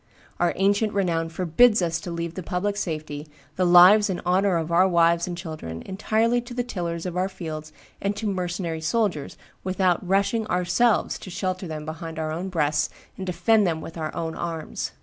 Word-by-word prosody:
Our 175 0 +2
ancient 205 +2 +2
renown 170 -4 0
forbids 185 +7 +4
us 170 -2 0
to - - -6
leave 170 -1 -4
the 185 - -5
public 185 +4 -2
safety, 155 -5 -4 0.3
the 185 -1 +2
lives 185 +4 +8
and 180 - -2
honor 185 +1 +3
of 165 0 -3
our 180 +3 +5
wives 170 -1 +3
and 175 - -4
our - - -8
children, 155 - -6
entirely 220 +5 +1
to 240 0 -10
the 245 - 0
tillers 170 -7 -4
of 180 -1 -4
our 185 +1 0
fields 155 -5 -7 0.3
and 200 +1 -1
to 220 - -5
mercenary 175 -4 -2
soldiers, 180 -5 -1 0.3
without 185 -2 +1
rushing 200 +4 +1
ourselves 200 +6 +1
to - - -9
shelter 185 0 -3
them 155 -1 -6
behind 160 +1 -6
our 155 -1 -2
own 175 +4 -3
breasts 150 -3 +1 0.3
and 190 - -6
defend 190 +4 +3
them 165 -2 -1
with 165 - -9
our 155 -2 -3
own 160 -1 -3
arms. 165 -2 -4
180 Hz, 190 wpm, -25 LUFS, 165-195 Hz, 0.3 s, lives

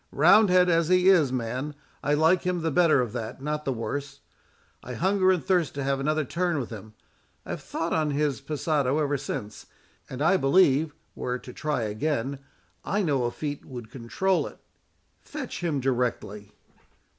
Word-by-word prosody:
Roundhead 185 -4 +5
as 165 -2 +2
he 185 +1 +4
is, 160 -9 +5
man, 130 +4 -3 0.3
I 145 +1 +2
like 160 +4 +3
him 180 -2 -2
the 160 - 0
better 160 -4 +4
of 120 -3 -3
that, 115 -1 -5
not 150 +2 -3
the 135 - 0
worse. 140 +4 -5 0.6
I - - -7
hunger 190 +1 +2
and 185 -3 +1
thirst 180 -7 +1
to 140 - -3
have 135 0 0
another 155 +2 0
turn 175 +3 -1
with 125 - -5
him. 110 0 -10 0.5
I - - -6
have - - -4
thought 165 +1 -3
on 155 -2 +1
his 145 -1 -1
passado 145 -1 0
ever 145 -2 0
since, 110 -6 -6 0.4
and 130 - -7
I 190 +4 +4
believe, 150 -1 +3 0.2
were 125 - -3
it 125 - -8
to 125 - -10
try 150 -6 -2
again, 135 +4 -2 0.4
I 205 +1 0
know 140 -7 +1
a 120 - -1
feat 145 +1 -5
would 120 -4 -9
control 140 +10 0
it. - - -12 0.6
Fetch 285 -10 -7
him 160 -5 0
directly." 120 -5 -2
145 Hz, 180 wpm, -26 LUFS, 130-170 Hz, 0.6 s, Roundhead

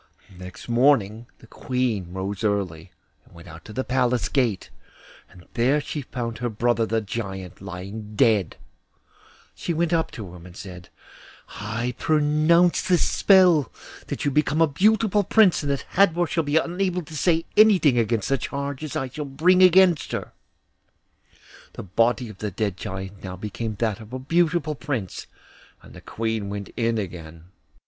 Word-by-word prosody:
Next 90 0 -11
morning 120 -3 +2
the - - -17
Queen 115 -7 -2
rose 95 +3 -4
early, 95 -5 -2 0.3
and - - -22
went 85 +1 -13
out 80 0 -12
to - - -10
the 130 +5 -3
Palace 125 -2 0
gate, 120 -8 -1 0.6
and 90 -1 -17
there 130 +5 +2
she 150 0 -5
found 120 -3 -5
her 120 0 -2
brother 115 +1 0
the 110 0 0
Giant 95 -4 -6
lying 100 +3 -8
dead. 105 - +2 1.0
She 170 - -4
went 170 +1 0
up 165 -1 +1
to 100 -6 -8
him 90 0 -12
and 90 - -14
said, 90 -1 -10 0.7
'I 115 +4 -3
pronounce 155 +3 +3
this 180 -2 +2
spell, 180 - +4 0.4
that - - -4
you 145 - +1
become 150 +2 +1
a 165 - +6
beautiful 205 +6 +2
prince, 200 -2 +4
and 145 -2 -2
that 140 - -3
Hadvor 175 -3 +3
shall 165 0 -1
be 145 +1 +1
unable 180 +2 -1
to 155 0 -11
say 165 +1 +1
anything 185 - +5
against 115 -2 0
the 135 -1 +1
charges 140 +2 -5
that - - -1
I 130 - -6
shall 150 +4 -6
bring 165 +7 +3
against 185 -2 +5
her.' - - -4 1.4
The - - -8
body 115 +6 +1
of 110 -3 -12
the 105 - -3
dead 100 0 -2
Giant 95 +1 -7
now 95 -1 -6
became 105 +3 -5
that 110 0 -1
of 110 +2 -12
a - - -2
beautiful 160 +3 +1
prince, 130 - -5 0.6
and - - -15
the - - -12
Queen 110 -2 -3
went 100 0 -6
in 115 -1 0
again. 85 -3 -7
120 Hz, 165 wpm, -24 LUFS, 100-155 Hz, 1.4 s, a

